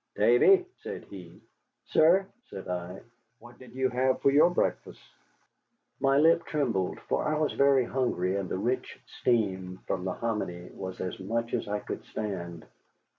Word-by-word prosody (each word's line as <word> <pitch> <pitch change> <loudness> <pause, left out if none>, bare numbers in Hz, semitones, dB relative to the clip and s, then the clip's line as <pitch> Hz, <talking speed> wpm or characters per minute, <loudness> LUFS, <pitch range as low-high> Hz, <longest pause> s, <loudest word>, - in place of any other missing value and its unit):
"Davy," 390 -4 +5 0.2
said - - -6
he. - - -11 0.5
"Sir?" 175 +5 +4 0.2
said 95 - -8
I. 90 +1 -5 0.4
"What 120 +1 -16
did 130 0 -14
you 130 0 +1
have 130 +1 +1
for 140 - +5
your 150 +5 +6
breakfast?" 175 - -2 1.0
My 135 0 +3
lip 165 +3 +5
trembled, 115 -12 -1
for - - -1
I 155 0 0
was 155 -1 0
very 140 -2 +4
hungry, 100 -8 -1
and 100 -2 -3
the - - -2
rich 125 +6 -2 0.2
steam 95 -6 0
from 90 - -2
the 95 - -2
hominy 90 -6 -4
was 95 -1 -7
as 90 - -4
much 115 +5 -3
as - - -1
I 105 0 -2
could - - -6
stand. 85 -6 -5
115 Hz, 160 wpm, -28 LUFS, 95-140 Hz, 1.0 s, your